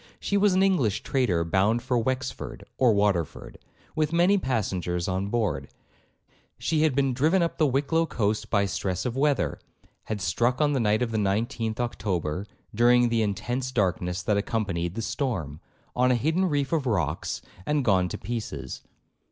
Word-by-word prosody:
She 200 - -2
was 200 -1 +4
an 190 - +4
English 145 - +1
trader 100 -11 +1
bound 100 +8 +1
for 130 0 0
Wexford 120 - -2 0.2
or 125 -3 +5
Waterford, 100 -6 0 0.4
with 155 -1 +1
many 175 +4 +4
passengers 90 - -1
on 95 +1 -1
board; 100 - -1 0.9
she 155 -1 0
had 155 -4 +2
been 135 -2 +2
driven 160 +8 +3
up 170 - -3
the 155 - +4
Wicklow 145 +5 +1
coast 110 -2 -1
by 100 -2 +2
stress 95 -1 -2
of 125 - -2
weather, 135 - +1 0.5
had 110 -1 -3
struck 120 +5 0
on 150 -1 +3
the 135 - +1
night 110 0 +2
of 115 - -2
the 110 - 0
19th 110 +3 -1
October, 100 -6 -2 0.3
during 120 +2 +4
the 115 -1 +1
intense 115 +6 -2
darkness 90 -5 0
that 105 - +1
accompanied 100 -5 -2
the 115 - -3
storm, 90 - -3 0.3
on 125 +1 +3
a 125 - +4
hidden 160 +9 +1
reef 145 0 0
of 150 -5 0
rocks, 85 - -1 0.2
and 150 -3 +1
gone 95 -4 +3
to - - -4
pieces. 115 +2 -5
115 Hz, 170 wpm, -26 LUFS, 95-135 Hz, 0.9 s, or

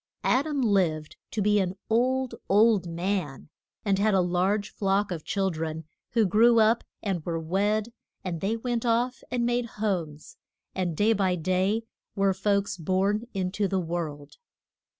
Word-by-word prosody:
Ad 270 +5 +2
am 285 -3 -1
lived 175 -8 +1
to 215 - -2
be 210 0 +3
an 185 -1 -1
old, 255 +3 +1 0.2
old 205 -2 +4
man, 170 -5 -3 0.4
and 195 -2 +2
had 210 0 +3
a - - +4
large 185 +4 0
flock 195 0 0
of 165 -3 -4
chil 195 -1 0
dren, 160 0 -4 0.3
who 225 -2 +4
grew 230 +5 +5
up 220 +2 +4 0.2
and 190 -6 -2
were 165 0 -2
wed, 205 +7 0 0.3
and 170 -3 -4
they 215 +4 0
went 240 0 -2
off 240 +1 +1
and 245 -1 0
made 240 0 0
homes, 170 -8 -3 0.4
and 175 -4 -2
day 215 +2 +4
by 190 -3 +1
day 185 +6 0 0.3
were 195 -1 +2
folks 200 0 0
born 195 +6 0
in 185 -1 -1
to 200 +1 0
the 190 0 0
world. 160 -4 -5
195 Hz, 165 wpm, -27 LUFS, 180-220 Hz, 0.4 s, grew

